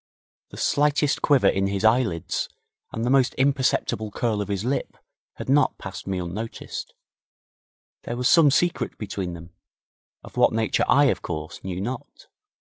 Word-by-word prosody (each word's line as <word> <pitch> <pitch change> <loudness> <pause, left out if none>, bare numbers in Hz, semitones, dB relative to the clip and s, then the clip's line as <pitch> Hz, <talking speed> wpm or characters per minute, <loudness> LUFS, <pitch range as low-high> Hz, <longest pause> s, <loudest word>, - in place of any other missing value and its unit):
The - - -11
slightest 145 0 +2
quiver 140 -4 +4
in 95 0 +2
his 100 +1 -1
eyelids 110 -8 +1 0.4
and 115 - -4
the - - 0
almost 130 -1 +3
imperceptible 130 -5 +1
curl 110 0 -1
of 100 - -4
his 100 +1 -2
lip 135 +3 -2 0.4
had - - -7
not 145 +2 +3
passed 95 -1 -8
me 95 -1 -1
unnoticed. 90 +6 -6 1.1
There 120 - -4
was 125 0 +1
some 165 -4 +6
secret 170 +6 0
between 100 -4 -4
them, 85 0 -10 0.7
of - - -13
what - - +4
nature 110 -1 +1
I, 145 +1 +5
of - - -4
course, 80 -1 -6
knew 95 -1 -4
not. 120 +5 -6
110 Hz, 155 wpm, -24 LUFS, 95-135 Hz, 1.1 s, some